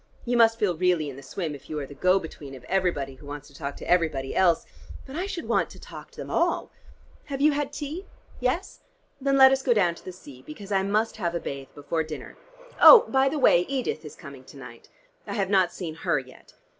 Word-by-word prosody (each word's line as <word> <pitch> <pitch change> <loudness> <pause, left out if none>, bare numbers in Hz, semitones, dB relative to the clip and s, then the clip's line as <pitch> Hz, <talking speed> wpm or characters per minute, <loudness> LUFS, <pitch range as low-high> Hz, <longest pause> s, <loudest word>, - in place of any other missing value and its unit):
You 245 0 0
must 225 -1 +5
feel 205 -6 0
really 170 -4 +1
in - - -11
the 135 - -10
swim, 155 +3 -5
if 140 -1 -12
you 155 - -4
are 140 - -4
the 145 - -11
go 185 +6 +3
between 150 -6 -8
of 130 - -13
everybody 170 -4 -1
who 135 +2 -15
wants 145 0 -8
to - - -20
talk 140 0 -6
to - - -9
everybody 160 -7 +1
else; 175 -3 +3 0.4
but 270 - -10
I 365 +4 -2
should 350 -4 -5
want - - +1
to - - -13
talk - - -11
to - - -22
them - - -7
all. - - 0 0.5
Have 275 -2 -5
you 300 +2 +5
had 290 -1 -2
tea? 300 +6 -6 0.3
Yes? 255 +10 -2 0.4
Then 275 0 +2
let 265 0 +8
us 270 0 +1
go 245 -3 +2
down 180 -5 +3
to - - -16
the 185 - -7
sea, 145 -8 -14
because 195 +8 -10
I 195 -1 +2
must 210 +4 0
have 175 -4 -2
a - - 0
bathe 135 -3 -6
before 150 +3 -2
dinner. 155 -1 -7 0.5
Oh, 475 - +11
by 270 0 +3
the 305 - -3
way, 260 -10 +5
Edith 265 -9 -2
is 150 - -10
coming 140 -2 -12
to 140 - -14
night. 125 -3 -12 0.4
I - - -4
have 195 -3 -1
not 185 -3 +3
seen 170 -4 -6
her 160 - -1
yet. 130 -1 -10
180 Hz, 240 wpm, -26 LUFS, -, 0.5 s, Oh